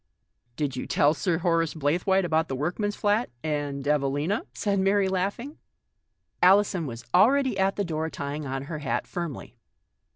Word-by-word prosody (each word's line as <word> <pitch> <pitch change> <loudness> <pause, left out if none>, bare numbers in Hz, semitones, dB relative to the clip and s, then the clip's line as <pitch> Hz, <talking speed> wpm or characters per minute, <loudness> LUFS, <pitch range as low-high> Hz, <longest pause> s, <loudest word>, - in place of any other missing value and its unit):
"Did 140 -2 -2
you 130 - -5
tell 145 +1 +3
Sir 165 +2 0
Horace 165 -2 +1
Blaythewaite 175 +6 +1
about 160 -1 +1
the 135 - -3
workman's 180 +9 -2
flat 210 +3 +1
— - - -40
and 145 -2 -3
Evelina?" 150 +6 0
said 200 -2 -1
Mary, 195 +1 +3
laughing. 200 - -3 0.8
Alison 190 -3 +4
was 120 -1 -8
already 265 +1 +4
at 195 +1 +2
the 200 - -1
door, 160 -1 -2
trying 145 0 -5
on 135 0 -3
her 155 +2 -6
hat 145 -2 -2
firmly. 165 -8 -6
165 Hz, 160 wpm, -26 LUFS, 145-195 Hz, 0.8 s, Alison